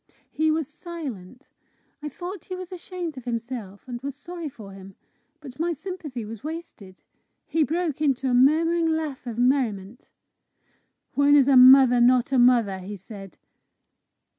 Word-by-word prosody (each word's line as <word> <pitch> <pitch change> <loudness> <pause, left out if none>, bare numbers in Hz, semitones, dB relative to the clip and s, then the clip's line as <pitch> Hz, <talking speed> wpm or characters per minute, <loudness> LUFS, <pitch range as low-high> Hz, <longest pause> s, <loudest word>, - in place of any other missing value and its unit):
He 315 0 +1
was 310 -2 0
silent. 285 - -9 0.5
I 300 - -5
thought 355 +5 -8
he 370 - -6
was 365 0 -8
ashamed 355 -4 -6
of 250 - -16
himself, 230 -4 -6
and 240 -1 -6
was 280 0 -5
sorry 335 +2 -7
for 215 -6 -12
him. 195 0 -13 0.4
But 275 -3 -12
my 340 +1 0
sympathy 310 - -7
was 220 0 -9
wasted. 305 - -9 0.4
He 325 - -1
broke 320 -1 -2
into 270 -3 +1
a 250 - +1
murmuring 325 +6 +3
laugh 315 -5 -3
of 230 -2 -5
merriment. 240 -4 -1 1.0
"When 285 0 +4
is 275 -2 +5
a 275 - +5
mother 255 -1 +8
not 250 +1 +3
a 265 - +3
mother?" 235 -6 +3
he 195 +3 -7
said. 195 -1 -12
270 Hz, 155 wpm, -24 LUFS, 235-320 Hz, 1.0 s, mother